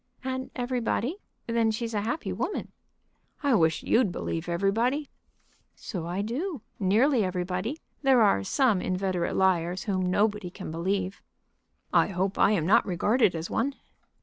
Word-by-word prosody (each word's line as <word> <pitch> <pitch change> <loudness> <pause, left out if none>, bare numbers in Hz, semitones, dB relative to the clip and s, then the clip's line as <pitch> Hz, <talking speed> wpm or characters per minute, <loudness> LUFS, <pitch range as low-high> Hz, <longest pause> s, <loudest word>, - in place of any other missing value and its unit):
"And 260 0 -3
everybody? 250 - -1 0.3
Then 230 -1 +1
she's 225 +1 -3
a 205 - 0
happy 235 +9 -2
woman." - - -3 0.7
"I 280 -2 +3
wish 160 -7 +2
you'd 230 -5 +3
believe 165 0 -4
everybody." 225 - 0 0.6
"So 175 -7 -6
I 185 +4 -2
do; 280 - -3 0.2
nearly 225 +6 +3
everybody. 185 - -2 0.2
There 265 -4 +5
are 150 - +3
some 220 - +2
inveterate 185 -2 -1
liars 180 -1 +1
whom 185 -3 0
nobody 205 0 +1
can 185 -2 -8
believe." 185 +3 -2 0.7
"I - - +5
hope 190 0 -2
I - - +6
am 195 -7 +1
not 195 +6 +5
regarded 200 +3 +2
as 165 +1 -4
one." 270 +4 0
200 Hz, 145 wpm, -27 LUFS, 180-240 Hz, 0.7 s, I